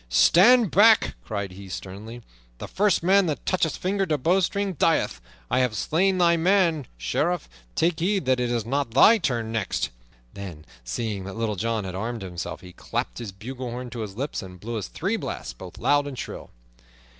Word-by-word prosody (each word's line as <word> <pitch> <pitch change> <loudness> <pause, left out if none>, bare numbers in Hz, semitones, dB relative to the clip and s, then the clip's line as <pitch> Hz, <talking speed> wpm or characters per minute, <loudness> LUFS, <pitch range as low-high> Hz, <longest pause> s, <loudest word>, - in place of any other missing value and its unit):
"Stand 215 - +6
back!" 220 +2 +6
cried 100 -3 -4
he 95 +1 -11
sternly. 105 +6 -8 0.3
"The - - -7
first 200 -4 +1
man 190 +1 +4
that 150 - -3
toucheth 170 -5 0
finger 195 +1 0
to 155 -2 +1
bowstring 190 +6 +1
dieth! 165 - +1 0.3
I - - +3
have 125 -4 +1
slain 185 - +1
thy 170 -1 +4
man, 170 -5 +2
Sheriff; 160 - -1 0.3
take 165 0 +1
heed 190 -1 0
that 130 -1 +2
it 125 -1 0
is 120 -2 -1
not 135 -1 -2
thy 220 +11 +7
turn 120 - -1
next." 115 -4 -1 0.4
Then, 90 -6 -8 0.2
seeing 100 - -3
that 100 +2 -7
Little 115 -2 -1
John 115 +2 -1
had 95 -1 -5
armed 110 +3 -4
himself, 90 -2 -6
he 90 -1 -12
clapped - - -4
his 115 -4 -6
bugle 125 +6 -7
horn 125 +1 -6
to 120 - -6
his 105 -2 -6
lips 140 -1 -3
and 90 -2 -10
blew 115 +2 -4
three 90 - -2
blasts - - -5
both - - -11
loud 145 0 +2
and 135 -3 -7
shrill. - - -7
125 Hz, 185 wpm, -25 LUFS, 105-175 Hz, 0.4 s, thy